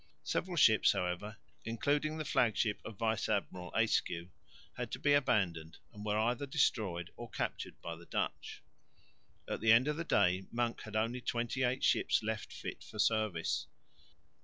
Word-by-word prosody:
Several 180 -1 -2
ships, 110 -7 +6
however, 100 +3 -3 0.3
including 145 +7 0
the 155 - -3
flag 120 -5 +2
ship 105 -3 +1
of 110 - -8
Vice 110 0 0
Admiral 90 -1 -2
Ayscue, 90 -6 +1 0.4
had - - -4
to - - -1
be 145 - +3
abandoned 95 - +1 0.2
and 105 0 -9
were 105 0 0
either 120 +5 0
destroyed 105 - 0
or 120 -1 -8
captured - - -4
by 85 - -4
the 85 +1 -14
Dutch. - - -3 0.8
At - - -3
the 110 0 +5
end 120 +4 +6
of 150 0 0
the 170 - -2
day 95 - +2
Monk 120 0 -1
had 110 0 -8
only 115 +3 0
twenty 120 +2 -2
eight 130 +1 +1
ships - - +3
left - - -3
fit - - -7
for 110 - -11
service. 105 -5 +1
110 Hz, 165 wpm, -34 LUFS, 95-125 Hz, 0.8 s, ships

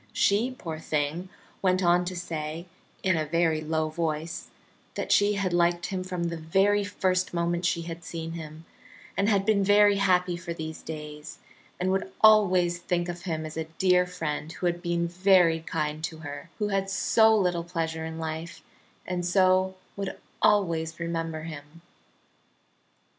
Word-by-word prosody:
She, 210 +5 +2
poor 160 -2 -6
thing, 155 +4 -2 0.3
went 185 0 +2
on 175 +1 +4
to 185 +1 -4
say, 165 -1 -4 0.4
in 190 -2 +3
a 160 - 0
very 165 0 +1
low 155 0 0
voice, 160 0 -3 0.5
that - - -3
she 205 +1 +4
had 195 -3 -1
liked 175 0 +2
him 185 -1 -3
from 180 -1 -4
the 170 -1 -2
very 195 +6 +2
first 185 -2 0
moment 170 +1 0
she 170 -1 0
had 165 0 -7
seen 165 -1 -5
him, 160 -1 -8 0.5
and 200 +2 +2
had 200 -2 +2
been 205 -2 +3
very 205 0 +5
happy 180 -2 +2
for 170 -1 -6
these 160 -1 -6
days, 150 -1 -8 0.4
and 185 +1 +1
would 190 0 -1
always 185 -5 +5
think 175 0 -1
of 175 +1 -6
him 160 -3 -2
as 155 - -7
a 160 - -2
dear 180 -1 +4
friend 160 -3 -4
who 180 - -5
had 175 0 0
been 170 -1 0
very 175 -2 +4
kind 155 -1 -3
to 160 - -7
her, 145 +1 -8
who 210 -1 -1
had 195 -1 0
so 220 +3 +4
little 180 -4 +1
pleasure 165 -2 -3
in 160 0 -5
life, 160 +1 -5 0.4
and 180 -1 -2
so 185 +1 +3 0.2
would 195 -1 -4 0.2
always 165 -5 +2
remember 165 -2 -3
him. 155 +1 -10
175 Hz, 165 wpm, -27 LUFS, 160-185 Hz, 0.5 s, very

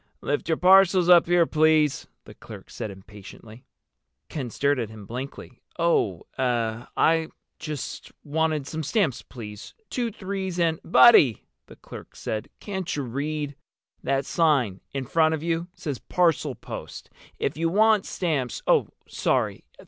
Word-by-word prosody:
"Lift 145 - -2
your 160 - +2
parcels 185 -1 +5
up 175 -2 +7
here, 175 -1 +4
please," 155 -2 +2 0.2
the - - -13
clerk - - -12
said - - -5
impatiently. 105 +4 -13 0.6
Ken 135 -6 -4
stared 140 +3 0
at 115 -3 -3
him 110 -2 -11
blankly. 125 +2 -8 0.2
"Oh—eh—I 125 - 0 0.3
just 150 -4 -6
wanted 155 -1 -1
some 160 +3 -5
stamps, 160 - 0
please. 105 -4 -10 0.2
Two 240 -2 -1
threes 190 -3 -4
and—" 165 -2 +1
"Buddy," 160 - +6 0.2
the - - -13
clerk - - -12
said, 110 -1 -4
"can't 190 -4 -4
you 145 - -2
read? 145 +3 -3 0.5
That 135 +1 0
sign 140 - +1
in 135 -1 -4
front 160 +4 +2
of 155 - -7
you 170 0 -1
says 145 -6 -5
parcel 165 -6 +1
post. - - -9 0.3
If - - -2
you 165 +2 0
want 215 +2 +3
stamps—" 150 -9 -2
"Oh, - - +3 0.2
sorry. - - -1
155 Hz, 140 wpm, -25 LUFS, 125-170 Hz, 0.6 s, up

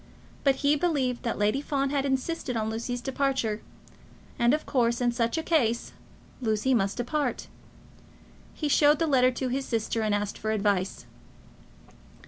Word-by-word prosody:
But 275 -2 +4
he 290 +1 +5
believed 280 -6 0
that 230 - -2
Lady 210 +6 +1
Fawn 275 -2 -1
had 280 -1 0
insisted 265 -1 -2
on 220 0 -1
Lucy's 235 +2 -3
departure; 260 -5 -1 0.8
and 235 0 +4
of 305 +2 0
course, 235 -3 +1
in 245 -1 +2
such 235 +3 0
a 320 - -1
case, 240 -10 +1 0.5
Lucy 220 +2 +1
must 200 -4 +1
depart. 255 +2 -1 1.1
He 305 - -2
showed 295 +1 +5
the 330 - +1
letter 260 -4 +4
to 255 +1 -3
his 270 +2 -1
sister, 225 -1 -1
and 215 -1 +1
asked 205 0 -3
for 215 - -3
advice. 200 -3 0
250 Hz, 155 wpm, -27 LUFS, 225-280 Hz, 1.1 s, he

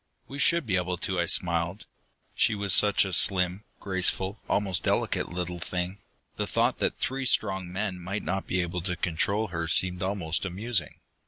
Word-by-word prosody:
"We 140 - -7
should 170 +2 +3
be 95 -5 +1
able 90 0 -1
to," 95 +1 -1
I 85 - +1
smiled. 85 +3 +1 0.5
She 110 - +3
was 100 -2 0
such 105 -1 +4
a 95 - -4
slim, 90 +2 +3
graceful, 95 +1 0
almost 95 -4 +1
delicate - - 0
little 90 0 -4
thing; 90 +3 -4 0.4
the - - -2
thought - - +1
that - - 0
three 135 0 -1
strong 95 -6 0
men 95 -1 -2
might 95 +4 -4
not 95 +1 -2
be 90 0 +1
able 85 0 -3
to 90 +1 -1
control 100 +6 0
her 85 -2 -3
seemed 90 +1 +1
almost 95 -4 0
amusing. 100 - -2
95 Hz, 175 wpm, -27 LUFS, 90-100 Hz, 0.5 s, such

